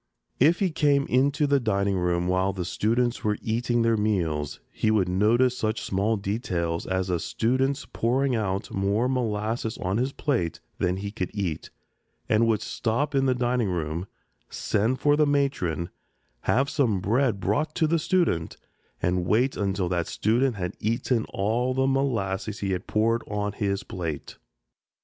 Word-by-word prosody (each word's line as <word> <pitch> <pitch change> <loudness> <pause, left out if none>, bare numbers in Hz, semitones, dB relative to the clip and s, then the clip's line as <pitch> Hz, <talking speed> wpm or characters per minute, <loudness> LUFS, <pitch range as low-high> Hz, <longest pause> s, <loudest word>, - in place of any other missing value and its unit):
If 160 +7 +5
he 190 -3 +1
came 145 -3 +2
into 140 +4 +2
the 140 -1 +3
dining 100 -4 0
room 90 -1 0
while 95 +1 +1
the 90 -2 -4
students 120 +6 0
were 105 -1 +1
eating 120 +1 0
their 115 -1 +3
meals, 85 -9 -1
he 110 - 0
would 105 -4 +3
notice 115 +7 +3
such 110 -1 -2
small 100 +4 0
details 95 -5 -2
as 95 0 -1
a 85 - +1
student's 130 - 0
pouring 130 +3 0
out 100 -2 -2
more 100 +5 +1
molasses 115 -2 -1
on 95 +3 -1
his 130 +3 0
plate 120 - -1 0.2
than 90 +1 +1
he 100 +1 -4
could 95 -4 -3
eat 95 -7 -3 0.6
and 110 +2 +3
would 110 -2 +1
stop 120 +7 -1
in 135 -1 +2
the 130 - +2
dining 125 -3 0
room, 85 +1 -3 0.4
send 115 +6 0
for 145 +2 +4
the 150 0 +3
matron, 135 - 0 0.5
have 135 +4 +3
some 130 -10 +1
bread 110 +3 +1
brought 155 +9 0
to 165 - +2
the 165 +2 +2
student, 160 - 0 0.5
and 90 0 +1
wait 125 +7 +2
until 100 -2 -1
that 85 -1 -1
student 120 +3 +1
had 90 -3 -4
eaten 115 +1 0
all 120 +6 -1
the 130 0 +2
molasses 110 -7 0
he 100 -1 -1
had 90 0 -3
poured 115 +2 +2
on 105 0 -2
his 100 -1 -2
plate. 85 -7 -5
110 Hz, 165 wpm, -26 LUFS, 95-130 Hz, 0.6 s, If